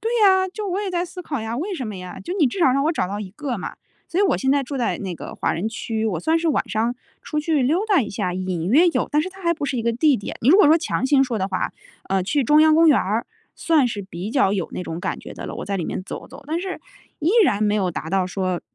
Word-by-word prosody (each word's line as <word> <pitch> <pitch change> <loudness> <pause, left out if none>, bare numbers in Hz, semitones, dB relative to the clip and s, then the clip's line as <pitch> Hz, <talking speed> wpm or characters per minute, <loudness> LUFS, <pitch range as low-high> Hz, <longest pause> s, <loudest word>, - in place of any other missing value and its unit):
对 450 - -2
呀， 380 -1 +5
就 420 -1 -4
我 375 +2 -1
也 400 -2 -3
在 350 0 0
思 360 +1 -9
考 285 -6 -3
呀， 225 +1 -4
为 370 +9 -3
什 260 -8 -4
么 210 -3 -6
呀？ 180 0 -8
就 350 - -5
你 310 - +5
至 250 - -3
少 300 -8 +4
让 275 +2 +1
我 320 - +2
找 245 - -1
到 200 +2 -4
一 195 -3 -7
个 255 +4 -4
嘛。 - - -6 0.3
所 350 - 0
以 - - +5
我 400 - +3
现 265 - 0
在 285 0 +2
住 275 +1 -5
在 240 - 0
那 190 -3 -4
个 - - -8
华 - - -1
人 180 +7 -2
区， 225 0 -3
我 180 -7 -1
算 320 - +2
是 330 0 0
晚 300 - 0
上 230 +3 0 0.3
出 300 - -2
去 300 -2 +1
溜 305 +9 +2
达 395 -7 +4
一 230 - -2
下， 180 -2 -2
隐 185 -2 -2
约 315 - +5
有， 335 - 0
但 300 - +3
是 350 - -2
它 380 +1 -14
还 340 -1 +3
不 315 - -4
是 265 - -2
一 230 - -1
个 235 +1 +1
地 275 +4 +3
点。 200 - -6
你 235 - +3
如 340 - +8
果 415 - +7
说 320 +3 +6
强 310 - -2
行 270 -1 +4
说 240 -4 -2
的 190 0 -1
话， 190 - -2 0.4
呃， 190 -1 +1
去 275 +8 0
中 300 +5 +5
央 315 0 +6
公 330 0 +6
园 295 - +6
儿 210 +5 -1 0.3
算 310 -6 +3
是 205 -3 -4
比 190 +2 -6
较 230 -6 +3
有 190 -5 -1
那 - - -4
种 165 0 -5
感 - - -3
觉 - - -10
的 - - -8
了， - - -6
我 - - -5
在 200 -1 -2
里 175 - -2
面 - - -4
走 - - -7
走， 280 +1 -13
但 320 +3 -1
是 375 0 -5 0.4
依 315 +3 +1
然 215 - +1
没 210 0 +2
有 190 -4 +1
达 160 - -5
到 190 +2 +1
说， 185 -2 -2
260 Hz, 325 characters per minute, -22 LUFS, 200-325 Hz, 0.4 s, 如